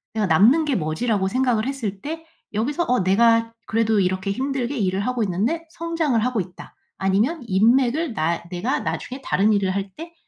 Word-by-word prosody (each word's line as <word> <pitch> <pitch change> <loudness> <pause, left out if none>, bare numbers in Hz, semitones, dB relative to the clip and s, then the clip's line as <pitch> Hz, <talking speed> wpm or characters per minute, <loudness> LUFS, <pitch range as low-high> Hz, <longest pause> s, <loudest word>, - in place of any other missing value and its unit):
내가 215 -2 +1
남는 225 - +5
게 285 -3 0
뭐지?'라고 190 +4 0
생각을 245 -2 +1
했을 225 -8 -4
때 320 +2 -6 0.3
여기서 275 +11 0
어 250 0 +3
'내가 230 +3 +3
그래도 220 -2 +2
이렇게 185 +1 -1
힘들게 270 +2 -2
일을 190 -3 0
하고 245 +2 -1
있는데 215 - -1
성장을 330 -7 -1
하고 250 -4 0
있다.' 180 -1 -11 0.2
아니면 205 - +1
인맥을 245 - +2
나 165 -1 -1
'내가 200 +10 -1
나중에 260 +2 -4
다른 210 +3 +2
일을 200 -2 +1
할 200 0 -2
때 335 +2 -9
230 Hz, 360 characters per minute, -22 LUFS, 195-270 Hz, 0.3 s, 남는